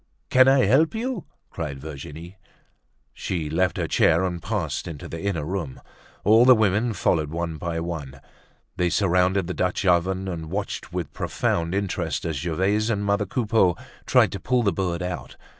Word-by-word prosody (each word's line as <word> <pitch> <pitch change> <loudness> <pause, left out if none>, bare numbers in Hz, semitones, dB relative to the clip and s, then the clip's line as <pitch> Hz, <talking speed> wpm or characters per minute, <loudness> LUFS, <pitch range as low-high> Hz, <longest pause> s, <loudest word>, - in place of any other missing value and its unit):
"Can 130 0 +6
I 135 -2 +5
help 145 - +3
you?" 240 -3 -3 0.3
cried 75 -5 -5
Virginie. 80 +4 -9 0.8
She 80 -5 -3
left 90 +3 +1
her - - -1
chair 80 +3 +3
and 90 -2 -3
passed 90 -9 -3
into 80 -4 -7
the 85 - -6
inner 95 -7 -2
room. 85 -6 -4 0.4
All 110 +4 +6
the 130 0 +8
women 110 +2 +2
followed 80 -5 +1
one 85 0 -3
by 85 0 -3
one. 75 -6 -6 0.6
They 90 -1 +2
surrounded 95 0 +2
the 90 - -4
Dutch 90 +2 -1
oven, 95 +1 +2
and 80 -3 -5
watched 100 -1 -4
with 90 -2 -4
profound 85 +2 -1
interest 100 -1 -2
as 80 -3 -2
Gervaise 95 +8 0
and 105 -2 -1
mother 100 0 +1
Coupeau 105 -5 +2 0.3
tried - - +4
to - - -5
pull 125 -1 +1
the 100 -4 +2
bird 90 -1 -2
out. 90 0 -5
90 Hz, 170 wpm, -24 LUFS, 85-105 Hz, 0.8 s, the